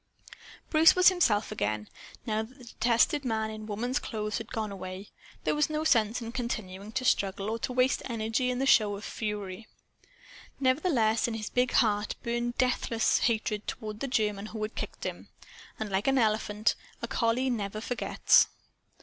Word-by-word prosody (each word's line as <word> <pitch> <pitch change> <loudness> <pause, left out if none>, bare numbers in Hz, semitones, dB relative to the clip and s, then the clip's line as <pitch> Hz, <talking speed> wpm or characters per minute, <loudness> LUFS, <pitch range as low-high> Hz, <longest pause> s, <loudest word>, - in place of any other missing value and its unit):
Bruce 315 0 +7
was 365 0 +7
himself 235 - +2
again. 105 - -2 0.4
Now 215 -1 0
that 240 +5 -10
the 255 - -14
detested 240 +5 +2
man 220 -3 -1
in 215 0 -8
woman's 240 +5 -1
clothes 215 -2 -3
had 225 - -9
gone 220 -4 -3
away, 190 0 -7 0.3
there - - +1
was 300 0 +1
no 310 0 -1
sense 230 -5 +2
in 230 - -6
continuing 215 -5 -4
to 260 -1 -2
struggle 200 -1 +1
or 230 - -2
to 250 - -3
waste 255 +1 +2
energy 230 +1 -1
in 250 0 -1
a - - +1
show 210 -6 +4
of 200 - -9
fury. 210 -1 -5 0.9
Nevertheless, 255 - +2
in 230 - -3
his 215 -1 -5
big 250 0 +1
heart 210 -2 +2
burned 240 0 -2
deathless 240 -3 +2
hatred 215 -2 0
toward 215 -1 -5
the 275 - -2
German 210 -5 0
who 220 0 -7
had 215 - -3
kicked - - -6
him. - - -5 0.5
And, 215 -2 -4
like 195 +4 0
an 270 0 +3
elephant, 215 -2 +1 0.3
a - - -1
collie 235 +3 +1
never 215 -2 -3
forgets. 245 +2 +3
225 Hz, 175 wpm, -29 LUFS, 210-250 Hz, 0.9 s, Bruce